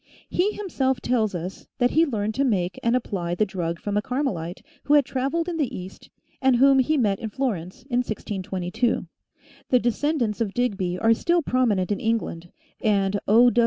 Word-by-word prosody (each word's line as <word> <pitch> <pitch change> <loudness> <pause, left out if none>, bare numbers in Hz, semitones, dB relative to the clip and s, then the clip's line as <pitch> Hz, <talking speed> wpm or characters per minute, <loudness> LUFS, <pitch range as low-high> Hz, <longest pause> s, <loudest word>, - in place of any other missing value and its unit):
He 400 +4 +1
himself 265 -11 -1
tells 225 -5 0
us 180 +3 -6
that 245 -1 +2
he 325 +2 +4
learned 215 -4 -1
to 270 - +1
make 185 -8 0
and 235 +1 +2
apply 180 -8 -2
the 215 - +2
drug 170 -4 -3
from 205 0 -2
a - - +2
Carmelite, 210 - -3 0.2
who 295 - +4
had 290 -3 +5
traveled 275 +6 -1
in 345 -2 -2
the 290 -6 -1
east, 185 +1 -10 0.3
and 265 -1 +4
whom 270 +2 +5
he 305 +4 +2
met 205 -6 +1
in 225 - -4
Florence, 215 -3 -3
in 245 -2 -1
1622. 205 -1 -2 0.6
The 250 - +5
descendants 240 -2 0
of 205 -4 -1
Digby 195 -7 0
are 225 +4 +4
still 340 +8 +1
prominent 220 -9 +1
in 205 - 0
England, 210 -7 -2 0.3
and 200 -2 +2
O. 235 +4 +6
230 Hz, 180 wpm, -24 LUFS, 195-265 Hz, 0.6 s, O